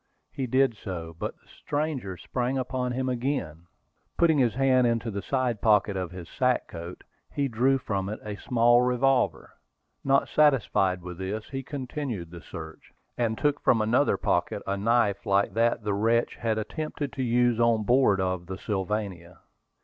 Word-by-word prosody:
He 130 - -3
did 130 0 +2
so; 85 -5 -7
but - - -3
the - - -32
stranger 145 - -3
sprang 125 +6 -2
upon 125 -1 -2
him 130 +1 -2
again. 120 - -2 0.5
Putting 160 -3 +4
his 120 -4 +2
hand 130 -2 +4
into 115 -1 -1
the 100 0 -4
side 125 -4 -1
pocket 105 -2 +3
of 90 -2 -3
his 90 -1 -9
sack 125 -2 0
coat, 85 +1 -8 0.3
he 140 -1 0
drew 130 +3 +2
from 100 -6 -3
it 105 - -5
a 105 -1 -4
small 120 0 +4
revolver. 125 -6 +1 0.5
Not 135 0 +3
satisfied 100 - +2
with 90 0 -8
this, 100 +3 -4
he 135 -1 -3
continued 130 - -5
the 85 -1 -9
search, 80 -1 -10 0.2
and 115 -2 -1
took 145 -1 0
from 115 - +3
another 120 +6 +2
pocket - - -1
a 100 - -1
knife 105 -1 +1
like 100 +1 +2
that 115 0 +1
the 105 -1 -1
wretch 115 +4 +1
had 110 -2 -1
attempted 145 +5 -4
to 135 - -4
use 120 -1 +2
on 115 -2 +3
board 120 -4 +3
of 95 -2 -2
the 95 0 -5
Sylvania. 95 -4 -4
115 Hz, 170 wpm, -27 LUFS, 100-130 Hz, 0.5 s, Putting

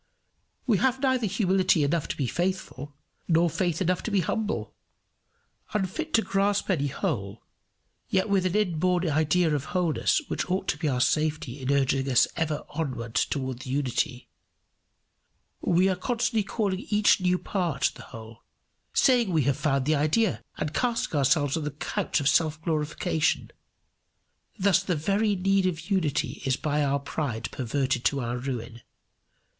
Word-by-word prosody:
We 220 -7 +2
have 260 0 +2
neither 260 -4 +1
humility 190 -4 +2
enough 145 +2 0
to - - -4
be 140 - 0
faithful, 175 -2 -3 0.3
nor 170 0 +3
faith 175 +1 0
enough 185 0 0
to - - -4
be 200 -3 +2
humble. 215 +5 -2 1.0
Unfit 210 - -2
to 225 - +4
grasp 200 +1 +1
any 145 -6 +1
whole, 100 -5 -3 0.7
yet 190 +2 +1
with 195 -2 +2
an 180 - -3
inborn 180 -3 +1
idea 155 +2 +2
of 145 -3 -1
wholeness 175 - +2
which - - -3
ought 190 +1 -1
to - - -1
be 160 - -1
our 125 -3 0
safety 150 -2 0
in 130 +2 -1
urging 135 -1 +1
us 125 -2 +4
ever 155 -2 -1
on 130 -7 -4
towards 130 -2 -1
the - - -7
Unity, 130 -2 -1 1.3
we 180 +2 +3
are 190 - +1
constantly 240 +3 0
calling 200 -1 -2
each 210 -2 +4
new 180 0 +2
part 170 -8 -1
the - - -12
whole, 115 -1 -11 0.5
saying 245 -5 +4
we 160 -4 +2
have 140 +1 +2
found 135 -3 0
the 155 - +2
idea, 155 +8 +1 0.2
and 150 0 -3
casting 240 -5 -1
ourselves 145 0 +2
on 160 - -2
the 150 - -2
couch 150 +2 -2
of 140 - -1
self 155 0 +2
glorification. 155 0 0 1.1
Thus 190 -2 +3
the 185 -2 -1
very 200 +7 +1
need 195 0 +2
of 170 +2 -4
unity 155 -6 0
is 130 -2 +1
by 150 -1 0
our 140 0 +1
pride 140 -5 -4
perverted 130 0 -1
to 140 -1 +2
our 120 +1 -3
ruin. 120 -3 -5
160 Hz, 160 wpm, -27 LUFS, 140-190 Hz, 1.3 s, to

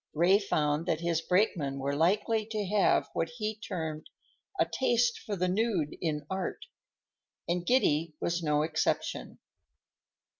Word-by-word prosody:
Ray 180 +6 +5
found 155 -4 0
that 160 -1 0
his 170 -1 0
brakemen 170 -7 +1
were 140 +1 -2
likely 205 +7 +2
to 215 -2 -2
have 200 +1 +3
what 165 - -1
he 215 -1 -2
termed 160 -7 -5 0.5
"a - - +5
taste 240 -2 +1
for 205 - -4
the 185 -1 0
nude 185 -6 0
in 150 -3 -2
art," 190 +2 -4 0.8
and 175 0 -1
Giddy 165 - +2
was 170 0 -1
no 150 -2 +2
exception. 160 0 -1
175 Hz, 140 wpm, -30 LUFS, 155-210 Hz, 0.8 s, Ray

